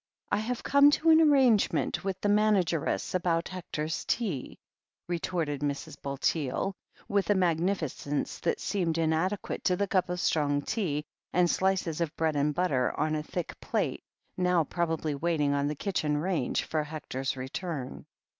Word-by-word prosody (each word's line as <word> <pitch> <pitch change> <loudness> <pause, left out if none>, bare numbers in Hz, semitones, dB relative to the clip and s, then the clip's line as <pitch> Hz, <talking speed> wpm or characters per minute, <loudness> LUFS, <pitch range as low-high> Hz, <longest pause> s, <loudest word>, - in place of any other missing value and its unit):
"I - - +3
have 235 +3 -3
come 280 +1 +6
to 320 +2 +4
an 320 0 +7
arrangement 265 -9 +3
with 190 -1 -2
the - - +1
manageress 205 -7 +2
about 170 -2 0
Hector's 160 -4 -4
tea," 190 - -2 0.5
retorted 165 -4 -2
Mrs. 145 +1 -3
Bulteel, 140 +5 -1 0.3
with 200 -1 0
a 205 - +5
mag 175 -4 +2
nificence 160 -5 -2
that - - 0
seemed 170 -5 -1
inadequate 165 +5 0
to 180 - +3
the 200 - 0
cup 185 -2 +1
of 180 0 -2
strong 145 -4 +1
tea, 155 -9 -1 0.3
and 180 0 +4
slices 185 -3 0
of 165 -2 -2
bread 160 -2 +1
and 145 +1 +1
butter 140 -9 +1
on 155 0 +1
a 155 - 0
thick 170 +2 -5
plate - - -1 0.4
now 180 -2 +3
probably 160 -1 -1
waiting 150 -1 +1
on 140 0 +1
the 150 - -2
kitchen 155 -4 -1
range 160 -4 0
for 155 -1 -1
Hector's 140 -3 -4
return. 130 +1 -5
165 Hz, 155 wpm, -29 LUFS, 150-190 Hz, 0.5 s, an